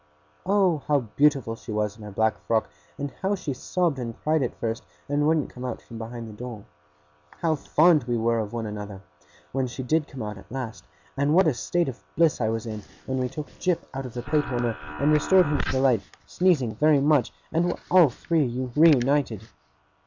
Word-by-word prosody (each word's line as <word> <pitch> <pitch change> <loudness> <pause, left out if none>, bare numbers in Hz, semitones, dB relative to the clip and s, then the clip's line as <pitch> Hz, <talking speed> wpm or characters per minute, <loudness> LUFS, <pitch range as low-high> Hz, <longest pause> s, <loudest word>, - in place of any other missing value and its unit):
Oh! 190 -5 +3
How 145 -2 +3
beautiful 140 -6 +3
she 115 - -9
was 105 -1 -1
in 110 - -15
her 105 - -7
black 110 +2 +1
frock, 110 -8 +1 0.3
and 140 -1 -4
how 195 +1 +1
she 150 -7 -4
sobbed 165 +2 -1
and 115 -2 -5
cried 155 0 +2
at 125 - -2
first, 115 0 -2 0.2
and 145 +1 +1
wouldn't 155 -2 +1
come 125 - -9
out 125 - -3
from 115 -2 -11
behind 115 0 -6
the 110 - -9
door! 115 -2 -8 0.6
How 165 - -1
fond 155 -1 +3
we 120 -1 0
were 115 0 +1
of 105 -2 -3
one 115 -1 -3
another, 105 -2 -7 0.5
when 135 -1 0
she 130 +2 -6
did 155 +4 +1
come 130 -4 -7
out 105 -2 -6
at - - -17
last; 125 -4 -5 0.3
and 140 +3 +2
what 190 +1 +6
a 155 - +3
state 170 +7 0
of 130 -2 -6
bliss 165 -5 +3
I 110 - +2
was 115 0 -2
in, 110 -2 -5 0.2
when 130 0 -2
we 125 0 -1
took 150 +3 -7
Jip 180 -2 0
out 135 0 -4
of 125 - -12
the 120 - -4
plate 150 +2 0
warmer, 120 -3 -1 0.2
and 150 +2 +3
restored 180 +5 +5
him 145 -1 0
to - - -1
the 130 - +1
light, 130 -6 +3 0.2
sneezing 160 -11 +2
very 150 +5 +4
much, 145 -3 +3 0.2
and 165 +2 +2
were 175 - -1
all 175 -5 +7
three 130 -1 -1 0.2
reunited! 140 - +4
130 Hz, 210 wpm, -25 LUFS, 115-155 Hz, 0.6 s, all